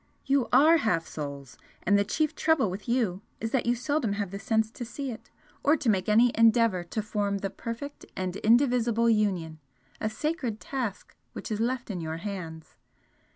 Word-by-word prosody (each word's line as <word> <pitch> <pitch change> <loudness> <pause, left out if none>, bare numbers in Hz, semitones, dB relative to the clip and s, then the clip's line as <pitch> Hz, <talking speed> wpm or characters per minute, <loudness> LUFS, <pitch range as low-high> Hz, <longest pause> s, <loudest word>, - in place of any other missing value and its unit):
You 275 -3 +2
ARE 305 +6 +7
half 220 - +1
souls, 140 -4 -7 0.2
and 205 - +3
the 200 - +4
chief 300 +9 0
trouble 300 - +2
with 195 +5 -7
you 220 -7 +1 0.2
is 225 0 -3
that 260 -3 0
you 240 - +3
seldom 250 -3 0
have 200 -2 -3
the 200 - -5
sense 220 +1 +1
to 240 - -7
see 265 +3 -5
it, 220 - -10 0.3
or 300 +3 +4
to 265 -5 0
make 190 0 -1
any 230 +3 +5
endeavour 225 -5 +4
to 215 +5 -3
form 205 -1 -1
the 195 0 -3
perfect 235 +7 -7
and 185 -1 -2
indivisible 235 -1 +3
union, 185 -7 0 0.4
a 215 - -1
sacred 255 -3 -2
task 250 -7 -4 0.2
which - - -7
is 215 - -1
left 245 0 -1
in 180 -3 -4
your 160 0 -4
hands. 165 -5 -7
220 Hz, 185 wpm, -28 LUFS, 195-245 Hz, 0.4 s, ARE